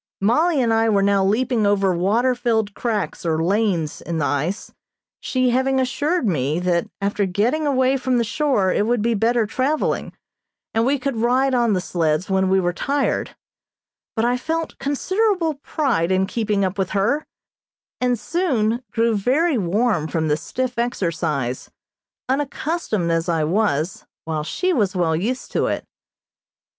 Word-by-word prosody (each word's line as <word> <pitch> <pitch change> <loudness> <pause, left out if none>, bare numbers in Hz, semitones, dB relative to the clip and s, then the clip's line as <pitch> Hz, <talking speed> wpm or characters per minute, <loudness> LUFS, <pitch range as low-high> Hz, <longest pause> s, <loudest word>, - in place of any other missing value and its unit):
Mollie 290 - +2
and 235 -3 +2
I 225 0 +3
were 200 -2 +3
now 200 -1 +3
leaping 220 +2 +1
over 195 -2 +2
water 215 +9 +2
filled 225 -4 0
cracks 220 -3 -2
or 160 -1 0
lanes 185 -5 0
in 170 -1 -4
the 155 - 0
ice, 150 +10 -2 0.5
she 255 -1 0
having 265 +2 +2
assured 260 +4 0
me 150 -3 0
that 175 -1 0
after 200 0 0
getting 240 +12 0
away 260 -1 +2
from 255 -1 0
the 235 - +2
shore 225 -5 +1
it 210 - +1
would 240 -2 +1
be 235 0 +2
better 230 +2 +2
traveling, 265 +8 -1 0.6
and 225 +2 +2
we 285 +2 +2
could 270 -2 -3
ride 255 +4 +2
on 240 -3 +2
the 185 - +1
sleds 165 +1 -1
when 190 0 +2
we 190 0 +4
were 175 -1 0
tired, 280 +8 -1 0.8
but 225 0 +1
I 245 +1 +2
felt 325 +5 -3
considerable 365 +4 0
pride 270 - -1
in 190 0 +2
keeping 210 -2 0
up 190 +2 -3
with 190 -1 0
her, 240 +10 +1 0.7
and 250 -1 +1
soon 245 - 0
grew 230 +1 +1
very 265 - +2
warm 195 -2 +1
from 160 -1 -1
the 150 - +3
stiff 250 +6 -3
exercise, 160 - -2 0.6
unaccustomed 270 - -1
as 165 +1 0
I 165 -2 +1
was, 170 -2 0 0.2
while 155 -2 -2
she 365 - -1
was 200 - +1
well 170 -3 +1
used 230 +10 -3
to - - +1
it. - - -2
220 Hz, 160 wpm, -21 LUFS, 185-255 Hz, 0.8 s, we